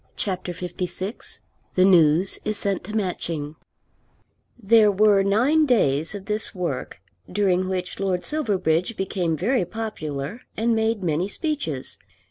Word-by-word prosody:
CHAPTER 185 -2 -3
LVI 180 +4 -4 0.4
The 185 - +5
News 175 0 +4
Is 215 -1 +1
Sent 200 -2 0
to 215 - -5
Matching 165 -7 -2 1.0
There 220 -1 +5
were 205 0 +4
nine 255 +11 +3
days 165 - +2
of 195 -1 -7
this 210 0 -1
work, 170 -8 -4 0.3
during 185 -1 +1
which 185 -1 -3
Lord 190 -2 -1
Silverbridge 200 - 0
became 180 -4 -1
very 230 - +1
popular 175 - -5 0.2
and 230 +1 +2
made 220 -2 0
many 170 +2 0
speeches. 210 - -3
190 Hz, 125 wpm, -23 LUFS, 175-215 Hz, 1.0 s, The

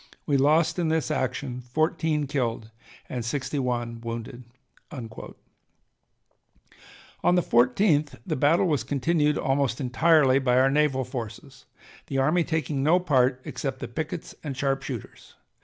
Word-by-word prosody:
We 145 - +1
lost 155 +6 +3
in 170 - +1
this 160 -1 0
action 130 0 -2
fourteen 155 +3 0
killed 120 -6 -2 0.4
and 125 -2 -4
sixty 140 +4 -2
one 120 -2 -2
wounded." 115 +1 -6 0.5
On 125 -6 -6 2.3
the 180 - +3
14th 145 - +2
the 165 -5 -1
battle 155 +7 +3
was 155 -6 +1
continued 150 +2 +1
almost 135 -2 0
entirely 135 +1 +4
by 125 -2 +2
our 135 +1 +4
naval 145 -2 +2
forces, 120 -4 -8 0.4
the 135 - -3
army 155 +6 +3
taking 155 -4 -2
no 160 +6 +4
part 130 -6 +2
except 135 -2 -4
the - - -6
pickets 155 +6 -5
and 140 -4 -5
sharp 135 0 0
shooters. 130 -5 -8
135 Hz, 135 wpm, -26 LUFS, 125-155 Hz, 2.3 s, entirely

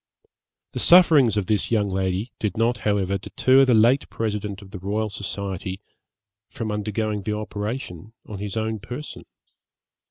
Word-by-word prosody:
The - - -4
sufferings 155 - +6
of 100 - 0
this 105 0 0
young 105 -3 +2
lady 95 +3 -2
did 105 +1 -2
not 115 +2 +2
however 100 -3 0
deter 130 +7 +3
the 125 -3 +4
late 120 +5 +4
President 105 -2 -3
of 95 - -15
the 100 - -7
Royal 105 +3 -2
Society 95 -1 -5 0.7
from 110 -2 -4
undergoing 105 0 -2
the 105 +2 -2
operation 105 -2 -5
on 105 -3 -8
his 105 +1 -4
own 110 0 -2
person. 125 +9 -8
105 Hz, 150 wpm, -23 LUFS, 100-115 Hz, 0.7 s, sufferings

